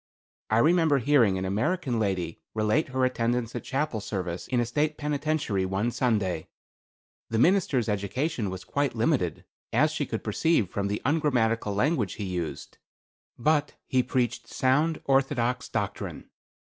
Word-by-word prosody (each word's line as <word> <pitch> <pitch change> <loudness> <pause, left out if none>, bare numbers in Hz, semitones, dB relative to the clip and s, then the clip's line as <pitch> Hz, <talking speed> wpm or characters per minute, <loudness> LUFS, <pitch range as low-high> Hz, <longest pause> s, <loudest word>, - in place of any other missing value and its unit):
I 110 - +3
remember 160 +2 +4
hearing 125 -7 +3
an 95 - -2
American 120 - 0
lady 95 -6 -2
relate 110 +9 +2
her 130 -1 +1
attendance 120 -1 0
at 120 - -4
chapel 135 -5 -2
service 90 -4 -4
in 125 - +1
a 120 - +2
State 150 +6 0
penitentiary 145 -8 -1
one 95 +5 0
Sunday. 105 -10 0 0.8
The 115 - -1
minister's 150 - +3
education 110 - -1
was 95 -1 -6
quite 145 -2 -1
limited, 115 - 0 0.3
as 150 +7 +3
she 150 -3 -2
could 110 - -4
perceive 110 - +1
from 100 -1 -1
the 105 +1 -3
ungrammatical 120 -8 +1
language 120 - +1
he 105 - -5
used, 85 -6 -5 0.6
but 150 +3 +1
he 130 -2 +2
preached 125 -1 -1
sound 150 +5 +1
orthodox 130 -2 +1
doctrine. - - -4
120 Hz, 145 wpm, -27 LUFS, 105-145 Hz, 0.8 s, remember